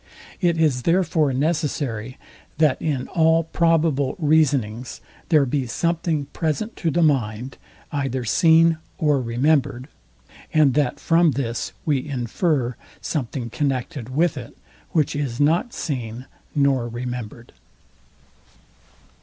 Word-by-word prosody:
It 175 -3 +2
is 150 -6 +2
therefore 165 -3 +2
necessary, 135 -5 -2 0.4
that 155 -3 +2
in 140 -5 -1
all 165 0 +3
probable 160 -4 +1
reasonings 140 - +1 0.3
there 155 -5 +5
be 130 0 -1
something 165 +2 -1
present 170 +8 -2
to 170 - 0
the 170 +2 +2
mind, 125 -4 0 0.3
either 135 -3 -2
seen 165 - +4 0.2
or 150 -3 +2
remembered; 130 +1 0 0.6
and 150 -4 +4
that 145 -3 0
from 165 -2 +3
this 120 -3 -3
we 140 -4 +1
infer 130 - -1 0.2
something 125 -5 -4
connected 130 -3 -2
with 150 +3 +1
it, 120 -3 -9 0.3
which 155 -4 0
is 135 -5 -3
not 165 - +2
seen 125 - -4 0.3
nor 135 -4 +2
remembered. 120 -1 -6
145 Hz, 110 wpm, -22 LUFS, 125-160 Hz, 0.6 s, there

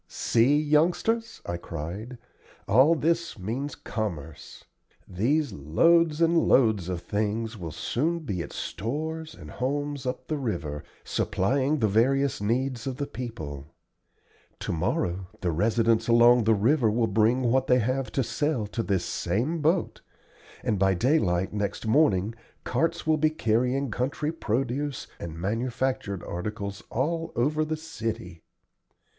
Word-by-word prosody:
"See, 125 +6 +2
youngsters," 175 +10 +1
I 85 - -3
cried, 85 +9 -6 0.5
"all 130 +11 +5
this 170 0 0
means 120 +9 -4
commerce. 80 -9 -6 0.4
These 130 - 0
loads 155 - +3
and 165 +1 +4
loads 110 - +3
of 90 -2 -3
things 110 +4 -2
will 85 -6 -6
soon 160 - -1
be 100 - -3
at 85 - -7
stores 155 - -4
and - - -11
homes 145 +1 -2
up 125 0 -3
the 155 -2 -2
river, 80 - -3 0.2
supplying 135 +9 0
the 110 - +2
various 130 +5 +2
needs 125 +3 -1
of 130 -1 -3
the 145 - -2
people. 80 - -7 0.8
Tomorrow 90 +2 -1
the 90 - 0
residents 110 +6 +2
along 120 0 +6
the 110 0 +5
river 115 +3 +3
will 115 +2 +2
bring 115 +4 +2
what 130 +2 +2
they 125 - +5
have 130 +3 -1
to 135 - +1
sell 145 -2 -1
to 105 +3 -3
this 95 -5 0
same 125 - -1
boat, 165 +4 +1 0.6
and 105 - 0
by 95 0 +3
daylight 95 - +1
next 105 +2 -3
morning 110 - +3 0.3
carts 165 +7 -1
will 155 0 +3
be 155 0 +3
carrying 125 -1 0
country 145 +6 -1
produce 135 0 -2
and 80 -1 -6
manufactured 115 0 -2
articles 100 +2 -5
all 165 +6 -1
over 150 +6 +1
the 155 0 -2
city. 115 - -5
120 Hz, 135 wpm, -27 LUFS, 100-145 Hz, 0.8 s, along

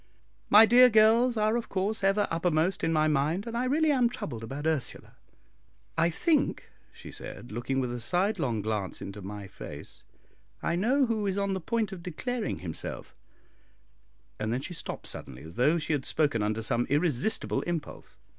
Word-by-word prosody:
My 215 +2 +9
dear 250 +2 +7
girls 225 +2 +4
are 215 +1 +2
of 235 -1 -3
course 200 +2 -2
ever 195 +2 +3
uppermost 165 +1 0
in 165 - +2
my 155 -1 +3
mind, 155 +6 0
and 230 -1 -5
I 245 +2 0
really 305 +4 +2
am 250 -4 +3
troubled 120 - -6
about 135 +6 -6
Ursula. 160 -5 -2 0.8
I 165 +1 +3
think," 310 - 0 0.2
she - - -12
said, 120 - -9
looking 120 +4 -2
with 125 -2 -2
a 120 - -4
sidelong 165 - 0
glance 105 -3 -2
into 100 +1 -7
my 100 +1 -7
face, - - -10 0.6
"I 170 - 0
know 255 +9 +2
who 220 -3 -1
is 195 0 -1
on 200 -1 0
the 190 - -3
point 220 +2 -1
of 190 -3 -7
declaring 215 +7 -3
himself," 85 -3 -6 1.2
and 115 +5 -2
she 175 - -6
stopped 165 - -5
suddenly, 65 0 -8
as 80 +1 -10
though 150 - +3
she 160 -1 -1
had 140 -3 -1
spoken 145 -8 +1
under 105 +2 -1
some 120 0 +1
irresistible 150 - +1
impulse. 170 -3 -5
170 Hz, 175 wpm, -28 LUFS, -, 1.2 s, My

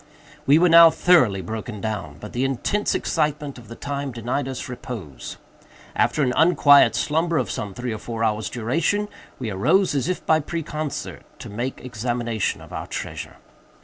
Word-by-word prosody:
We 140 +2 +7
were 180 +2 +5
now 170 0 +9
thoroughly 160 - +3
broken 110 +2 -6
down; 100 -9 -4
but - - -9
the 125 - -1
intense 135 - 0
excitement 150 -4 -1
of 115 - -15
the 115 - -9
time 140 0 -4
denied 120 +4 -3
us 130 -1 -5
repose. 105 - -7 0.6
After 150 - +2
an 125 -2 +1
unquiet 145 -4 +6
slumber 165 +2 0
of 125 -8 -1
some 100 -3 -5
three 125 0 -3
or 110 - -6
four 115 0 -4
hours' 110 -1 0
duration, 165 - -1 0.3
we 115 -4 -4
arose, 160 - +2
as 140 0 -1
if 185 - -3
by 160 0 +4
preconcert, 155 -2 -5 0.2
to - - -9
make 120 +5 -4
examination 120 -2 -2
of - - -13
our - - -5
treasure. - - -6
130 Hz, 170 wpm, -23 LUFS, 110-155 Hz, 0.6 s, now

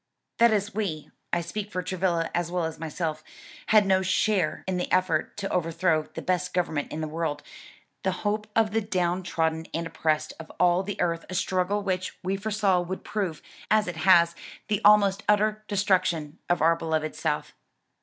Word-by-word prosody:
"That 235 0 +7
is 210 0 0
we 190 -8 -3 0.2
(I - - +1
speak 205 +5 -5
for 185 -3 -3
Travilla 175 -2 -1
as 175 -1 -1
well 180 -1 0
as 160 -1 -4
myself) 160 -1 -3 0.4
had 215 -1 +5
no 190 -1 +3
share 190 -2 +1
in 185 -1 -1
the 180 - -3
effort 185 -4 +1
to 200 -1 -3
overthrow 165 -1 +1
the - - -5
best 180 0 -1
government 160 -5 -1
in 155 - -4
the 155 - -2
world, 155 -2 -3 0.6
the 190 - +1
hope 210 +1 0
of 220 -2 +3
the 225 +1 +1
down 185 -3 0
trodden 160 -2 -1
and 165 +1 -2
oppressed 155 -1 -1
of 160 - -9
all 175 +1 +4
the 200 +1 -5
earth 170 -1 0
a 185 - -5
struggle 190 +2 0
which 185 -2 -2
we 190 +2 0
foresaw 200 -2 +1
would 185 +2 -5
prove, 190 -7 -3 0.3
as 215 -1 +4
it 175 -2 -4
has, 170 -1 +5 0.4
the 210 -2 +1
almost 200 -1 +5
utter 215 +1 +2
destruction 185 -6 0
of 175 -3 +2
our 165 +1 +5
beloved 160 -2 -2
South. 150 -2 -2
180 Hz, 185 wpm, -26 LUFS, 165-200 Hz, 0.6 s, That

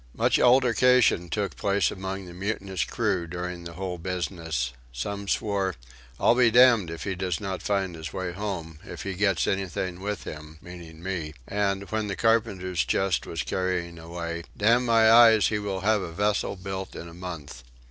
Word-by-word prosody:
Much - - +2
altercation 125 -6 +4
took 100 +3 -2
place 100 0 +1
among 95 0 -5
the 90 - -10
mutinous 95 -1 -2
crew 85 -2 -1
during 90 +1 -5
the 85 - -7
whole 90 0 -5
business: 85 -8 -3 0.2
some 100 +12 -4
swore 95 -2 0 0.4
"I'll - - +5
be 120 -1 +5
damned 120 -6 +6
if 85 0 -6
he 100 - -2
does 90 -2 -2
not 95 -3 -4
find 95 -3 -1
his 80 -1 -7
way 95 -2 -3
home, 90 -5 -5
if - - -8
he 100 - -3
gets 95 0 +1
anything 95 -1 -2
with 105 +2 -4
him," 75 0 -9
(meaning 85 -1 -11
me) 85 -5 -4
and, 100 -1 0
when 110 -1 -1
the 100 - -3
carpenter's 95 -7 +1
chest 95 -8 0
was - - -3
carrying 90 -2 -2
away, 85 0 -5 0.2
"Damn 120 +4 +3
my 115 -1 +5
eyes 115 -2 +7
he 105 - -1
will 100 -2 -3
have 105 +1 +2
a 85 - -5
vessel 100 +3 0
built 95 0 -6
in 85 - -7
a 85 - -11
month." 85 -7 -8
95 Hz, 180 wpm, -26 LUFS, 85-105 Hz, 0.4 s, eyes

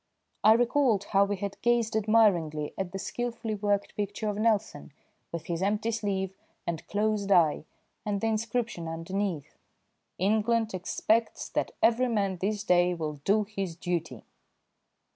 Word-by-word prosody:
I 215 - +8
recalled 240 -2 +2
how 200 0 +3
we 205 0 -1
had 200 0 -5
gazed 235 -2 +2
admiringly 200 -9 +2
at 190 -2 -3
the 195 - -4
skilfully 230 +2 -3
worked 205 -1 -1
picture 205 +1 -2
of 205 - -3
Nelson 215 -10 0 0.4
with 170 -1 -5
his 170 0 -3
empty 210 +3 0
sleeve 195 -4 -2 0.3
and 165 -2 -4
closed 205 -1 0
eye 160 -4 +4 0.4
and 205 -2 -1
the 225 - -2
inscription 225 -4 -1
underneath: 165 0 -3 0.6
"England 220 +3 +1
expects 215 +5 0
that - - -2
every 235 +2 +4
man 200 -5 0
this 205 +3 -2
day 180 -2 +3
will 150 -3 -5
do 210 +2 +3
his 195 -4 -4
duty." 170 - -3
205 Hz, 145 wpm, -28 LUFS, 180-220 Hz, 0.6 s, I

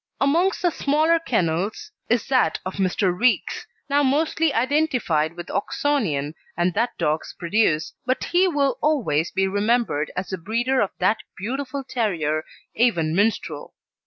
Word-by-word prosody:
Amongst 335 +9 +2
the 350 - +3
smaller 310 +3 +2
kennels 215 - -1 0.2
is 235 -1 +2
that 255 -12 +3
of 185 - -5
Mr. 185 -1 +1
Reeks, 245 +5 +1 0.2
now 285 0 +2
mostly 305 +3 +2
identified 250 - +1
with 175 0 -7
Oxonian 200 - -1 0.2
and 175 +1 +1
that 230 +5 -1
dog's 155 +1 -1
produce, 170 -3 +1
but 255 +1 0
he 365 +2 +3
will 285 -5 0
always 210 - +1
be 195 0 0
remembered 205 -6 0
as 180 +1 -3
the 190 - -4
breeder 240 +8 0
of 200 - +1
that 190 +4 +2 0.2
beautiful 270 +6 -4
terrier, 170 - -1 0.3
Avon 175 -10 +2
Minstrel. 205 +5 -1
225 Hz, 140 wpm, -23 LUFS, 175-280 Hz, 0.3 s, the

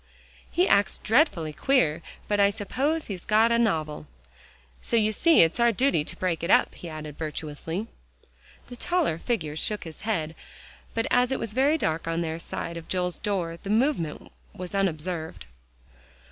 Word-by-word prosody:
"He 360 +2 +2
acts 200 0 +3
dreadfully 210 - +2
queer, 165 - +2 0.3
but 205 -1 +1
I 200 0 +6
suppose 265 +10 -1
he's 190 -4 -6
got 220 +2 +4
a 235 - +3
novel. 155 - 0 0.7
So - - -1
you 215 -1 +3
see 330 +10 +5
it's 165 +8 0
our 235 0 +5
duty 250 - +2
to - - -5
break 180 -3 -1
it 170 - -3
up," - - +4
he 175 - -9
added 155 -2 -8
virtuously. 160 +4 -4 0.8
The 245 - -10
taller 325 - 0
figure 165 -12 -2
shook 210 +6 -2
his 160 -2 -10
head, 165 -8 -1 0.6
but 225 +1 0
as 250 +1 +3
it 265 - +1
was 215 - -4
very 280 +6 +3
dark 160 - -1
on 165 +1 0
their 165 -1 -3
side 170 0 -5
of 165 - -9
Joel's 180 -1 -1
door, 175 -5 -2
the 195 - -7
movement 215 - 0 0.2
was 180 0 -7
unobserved. 170 - -2
190 Hz, 170 wpm, -26 LUFS, 160-235 Hz, 0.8 s, I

